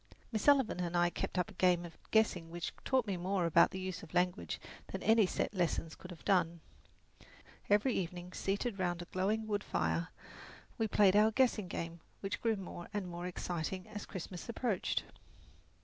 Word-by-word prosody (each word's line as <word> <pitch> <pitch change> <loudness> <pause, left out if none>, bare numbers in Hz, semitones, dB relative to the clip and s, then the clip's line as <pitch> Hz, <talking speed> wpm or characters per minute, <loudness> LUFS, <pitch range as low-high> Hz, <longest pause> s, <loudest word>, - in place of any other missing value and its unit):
Miss 215 -3 -1
Sullivan 270 -8 +4
and 175 -1 -1
I 175 0 +3
kept - - -3
up 180 +4 0
a - - -13
game 180 -2 +3
of 170 - -10
guessing 190 -7 +2
which 175 0 -4
taught 260 -3 +2
me 195 -4 -2
more 185 0 0
about 170 0 +6
the 190 - -5
use 185 -1 -4
of 170 +1 -11
language 175 - +1 0.3
than - - -5
any 220 -1 +5
set - - -1
lessons 170 -3 0
could 180 - -11
have 175 -3 -11
done. 170 -3 +2 1.1
Every 210 +5 +4
evening, 180 0 -3
seated 200 +2 -1
round 175 -1 0
a - - -11
glowing 205 +5 0
wood 205 -1 -1
fire, 80 +1 0 0.7
we 225 - +2
played 200 -2 +5
our 210 +1 +6
guessing 220 -4 +2
game, 170 0 -4 0.2
which 195 - -3
grew 225 -1 +2
more 180 -3 -7
and 200 -3 -1
more 175 0 -5
exciting 180 +1 -3
as 210 -1 -6
Christmas 180 +1 -7
approached. 230 -4 0
185 Hz, 180 wpm, -34 LUFS, 175-210 Hz, 1.1 s, about